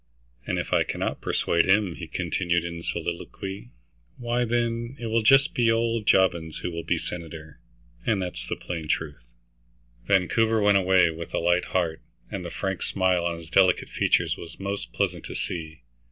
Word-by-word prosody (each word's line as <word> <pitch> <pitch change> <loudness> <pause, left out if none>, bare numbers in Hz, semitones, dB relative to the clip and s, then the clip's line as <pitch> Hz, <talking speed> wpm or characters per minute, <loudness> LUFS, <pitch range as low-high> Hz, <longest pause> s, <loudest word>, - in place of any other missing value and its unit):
"And - - 0
if - - -3
I - - +4
cannot - - -3
persuade 85 +2 +1
him," 100 -2 +4
he 85 0 -8
continued 85 0 0
in 85 -1 -5
soliloquy, 85 -2 -5 0.5
"why, 120 0 0
then, 120 +1 -1
it 120 - -5
will 115 0 +1
just 135 +6 +5
be 120 -2 +3
old 115 -1 0
Jobbins 85 -4 +3
who 90 - -2
will 85 0 -4
be - - 0
senator, 80 -2 -7 0.4
and 105 - +1
that's 90 -1 -4
the - - -2
plain 80 -3 -6
truth." 75 -7 -3 0.8
Vancouver 110 +4 +3
went 100 -1 +5
away 95 -2 +4
with 80 +1 -6
a - - +1
light 85 +1 +2
heart, 85 -4 -1 0.3
and 95 - -4
the 85 - -5
frank 95 +2 -3
smile 95 -2 +1
on 85 -1 -1
his 85 0 -12
delicate 95 0 +4
features - - +1
was 85 - -10
most 100 +1 -4
pleasant - - -1
to - - -7
see. 80 -3 -5
90 Hz, 175 wpm, -26 LUFS, 85-105 Hz, 0.8 s, just